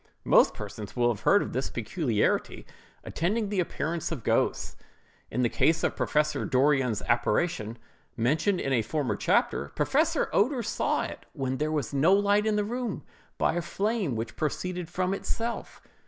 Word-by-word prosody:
Most - - +5
persons 105 -3 -7
will 120 -1 +3
have 105 - -13
heard 205 - +5
of - - -6
this 130 +2 -1
peculiarity 120 - -1 0.4
attending 205 +6 -1
the 200 -2 -1
appearance 170 -1 -2
of 145 -9 -4
ghosts. - - 0 0.5
In 125 +3 -1
the - - +4
case 155 +7 +2
of - - 0
Professor 150 0 0
Dorrien's 130 -3 +2
apparition, 120 -1 0 0.4
mentioned 155 - +1
in 135 - -1
a 120 - +3
former 125 -1 -1
chapter, 70 - +1
Professor 305 - +2
Oeder 245 +4 +2
saw 220 - 0
it, - - -8
when 130 -3 -2
there 150 +2 -1
was 145 -4 -2
no 155 +7 +4
light 205 +1 +2
in 215 - +2
the 210 -1 +1
room, 240 -1 -3 0.3
by - - +2
a 175 - -1
flame 200 - -1
which 110 0 -4
proceeded 175 +3 -3
from 185 +1 -1
itself. 230 +4 -4
155 Hz, 165 wpm, -28 LUFS, 125-200 Hz, 0.5 s, Most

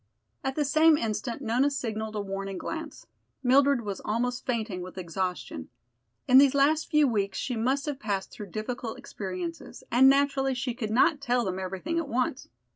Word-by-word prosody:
At 265 0 -2
the 300 - +1
same 310 +2 +5
instant 230 +2 -3
Nona 245 +5 +2
signaled 220 -5 -4
a 210 - -1
warning 195 -1 -4
glance. 320 - -6 0.4
Mildred 270 +1 +4
was 200 -3 -5
almost 245 +4 -2
fainting 220 -7 -2
with 185 +1 -9
exhaustion. 180 - -4 0.6
In 255 +1 +8
these 280 0 +5
last 300 +3 +3
few 300 -3 +4
weeks 200 -5 -1
she 250 - -2
must 260 +5 0
have 290 -3 -3
passed 200 -6 -3
through 210 - -8
difficult 225 +4 -4
experiences 185 -9 -6
and 260 +3 +7
naturally 275 -1 +2
she 250 0 -2
could 230 -3 -4
not 285 +7 +3
tell 245 -3 +1
them 185 0 -2
everything 190 - -3
at 330 - -3
once. 250 0 -1
245 Hz, 175 wpm, -28 LUFS, 205-275 Hz, 0.6 s, In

